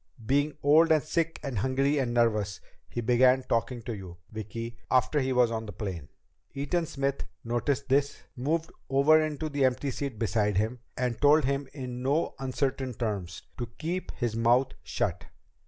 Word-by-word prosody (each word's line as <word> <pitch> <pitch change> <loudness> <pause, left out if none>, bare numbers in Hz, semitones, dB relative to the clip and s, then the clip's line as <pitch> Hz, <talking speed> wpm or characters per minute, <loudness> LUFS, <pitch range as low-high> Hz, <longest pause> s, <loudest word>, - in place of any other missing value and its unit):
Being 145 +5 +1
old 160 +3 +6
and 155 -2 +4
sick 165 +1 -1
and 135 -7 -2
hungry 135 +5 +1
and 125 -3 0
nervous, 105 -5 +1 0.3
he 120 - -3
began 125 +2 +4
talking 115 0 -1
to 115 - -4
you, 90 -4 -9
Vicki, 115 +2 -6
after 130 +4 +3
he 130 -1 0
was 125 -2 +4
on 110 -1 -3
the - - -5
plane. 90 -7 -5 0.5
Eaton 155 +5 -1
Smith 140 -1 -2 0.2
noticed 130 +4 -1
this, 140 +1 +1
moved 160 +6 -1 0.2
over 140 +4 +5
into 155 0 -3
the 145 -2 0
empty 130 +2 +1
seat 135 -2 -4
beside 105 -2 +1
him, 110 +5 0 0.2
and 125 -2 -1
told 145 0 +6
him 140 0 -1
in 125 -3 -6
no 140 +5 +1
uncertain 130 -1 -2
terms 100 -7 -3 0.2
to 120 - -2
keep 175 +4 -3
his 120 -4 -1
mouth 120 +3 +3
shut. - - -2
130 Hz, 170 wpm, -28 LUFS, 115-140 Hz, 0.5 s, old